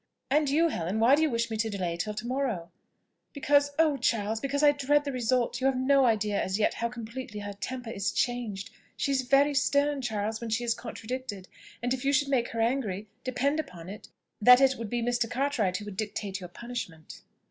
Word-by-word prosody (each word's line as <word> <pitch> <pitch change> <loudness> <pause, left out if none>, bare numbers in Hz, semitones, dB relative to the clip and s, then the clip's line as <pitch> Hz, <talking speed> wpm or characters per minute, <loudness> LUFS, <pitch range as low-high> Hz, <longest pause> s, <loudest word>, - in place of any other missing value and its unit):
"And 295 0 +3
you, 325 +4 +3
Helen, 185 - -2
why 235 +4 +5
do 295 - +4
you 315 - +3
wish 230 -2 -1
me 220 - -2
to 225 +1 0
delay 185 -5 -2
it 170 - -7
till 210 +4 -2
to 215 +2 -5
morrow?" 240 -10 -2 0.6
"Because, 285 0 +3
oh! 315 -3 +3
Charles, 220 -3 0
because 280 +3 -1
I 295 - +8
dread 290 +1 +2
the 285 - -3
result. 250 0 0
You 265 - +3
have 270 -1 +1
no 270 +1 +4
idea 210 -3 +1
as 190 +1 -1
yet 215 - +2
how 235 - -2
completely 235 -2 -7
her 205 0 -5
temper 245 +4 -5
is 200 -2 -1
changed. 230 -5 -2 0.3
She 280 - 0
is 270 -1 +2
very 275 +3 +3
stern, 285 0 +2
Charles, 220 -2 -2
when 235 - -4
she 225 +2 0
is 235 -1 +1
contradicted; 230 -4 -6 0.4
and 245 +1 +1
if 260 0 -4
you 280 +1 +2
should 280 0 +2
make 250 -4 +2
her 230 - -3
angry, 220 -5 -1
depend 275 +4 0
upon 180 - -6
it 205 +2 -9 0.3
that 250 +3 +9
it 270 -1 +4
would 230 -3 -6
be 240 +1 -1
Mr. 240 -1 0
Cartwright 245 -9 0
who 205 - -8
would 205 -2 -8
dictate 205 -2 -3
your 180 -2 -8
punishment." 185 -7 -7
240 Hz, 220 wpm, -28 LUFS, 210-275 Hz, 0.6 s, that